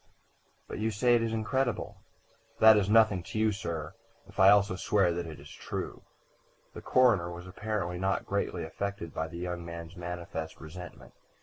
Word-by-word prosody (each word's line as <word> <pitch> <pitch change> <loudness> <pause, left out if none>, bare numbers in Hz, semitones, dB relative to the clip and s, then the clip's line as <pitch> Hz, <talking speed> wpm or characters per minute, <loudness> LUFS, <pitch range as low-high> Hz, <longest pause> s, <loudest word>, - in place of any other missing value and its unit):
"But - - -6
you 110 +1 +1
say 115 +3 +2
it 120 - +4
is 115 -1 -1
incredible." 120 +2 -1 0.6
"That 110 0 +8
is 105 -1 +2
nothing 110 -4 +5
to 110 - -7
you, 110 0 +3
sir, 85 -7 -4 0.3
if - - -13
I 95 0 +8
also 100 -2 +4
swear 95 -1 +2
that 85 0 -4
it 80 - -9
is 75 +1 -13
true." - - -6 0.7
The - - -8
coroner 115 -10 +3
was 90 0 -8
apparently 90 -2 -3
not 95 +1 0
greatly 100 -3 -2
affected 90 0 -5
by 80 - -2
the 85 - -9
young 90 0 -4
man's 85 0 -8
manifest 85 -2 -6
resentment. 90 +3 -10
95 Hz, 175 wpm, -30 LUFS, 85-110 Hz, 0.7 s, That